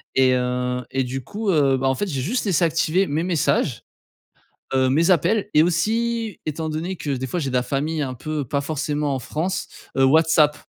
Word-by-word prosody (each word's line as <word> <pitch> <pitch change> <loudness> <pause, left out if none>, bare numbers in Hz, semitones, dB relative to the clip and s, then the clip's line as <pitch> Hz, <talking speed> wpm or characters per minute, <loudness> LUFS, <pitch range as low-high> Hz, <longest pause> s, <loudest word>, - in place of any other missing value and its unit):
et 130 -1 +4
heu, 125 0 -1
et 135 0 0
du 130 +1 -5
coup, 210 - -4
heu, 140 -4 +3
bah, 135 +1 0
en 130 - +1
fait, 205 - -2
j'ai 135 -7 -3
juste 225 - -1
laissé 185 -3 +2
activés 165 +4 +1
mes 155 +4 -1
messages, 150 -7 0 0.9
heu, 130 0 +3
mes 165 +7 +3
appels 195 +5 +2
et 150 - +6
aussi, 220 +5 0
étant 155 +1 -3
donné 165 +5 -3
que 155 -3 -6
des 130 0 -2
fois, 175 - -2
j'ai 140 - -2
de 130 - -3
la 125 - +2
famille 150 +5 -2
un 130 -2 -2
peu 150 +3 -4
pas 140 +3 -1
forcément 145 -1 -2
en - - -3
France, 165 +9 -3 0.3
heu, 135 - +4
WhatsApp. 155 0 +4
150 Hz, 205 wpm, -22 LUFS, 135-170 Hz, 0.9 s, et